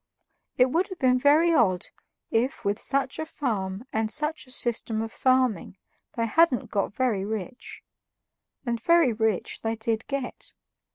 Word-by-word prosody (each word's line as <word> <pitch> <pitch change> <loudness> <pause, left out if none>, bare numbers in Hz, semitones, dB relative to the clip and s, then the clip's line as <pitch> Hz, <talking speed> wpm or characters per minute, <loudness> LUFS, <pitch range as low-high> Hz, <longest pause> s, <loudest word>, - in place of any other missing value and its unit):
It 250 0 +4
would 345 +5 +1
have 375 - -8
been 255 -3 +3
very 310 +5 +4
odd 195 - +2 0.4
if 240 +4 0
with 205 +2 0
such 270 0 0
a 315 - -2
farm 215 -8 -3
and 220 0 0
such 300 +3 -2
a - - -12
system 235 -2 0
of 225 0 -3
farming 255 -8 +1 0.4
they 230 - -1
hadn't 295 +2 +2
got 200 -2 0
very 235 -7 0
rich; 220 +4 -6 0.8
and 235 -2 -2
very 335 -4 +4
rich 220 -3 -1
they 225 0 -1
DID 225 0 -2
get. 275 -3 -5
245 Hz, 155 wpm, -26 LUFS, 220-275 Hz, 0.8 s, It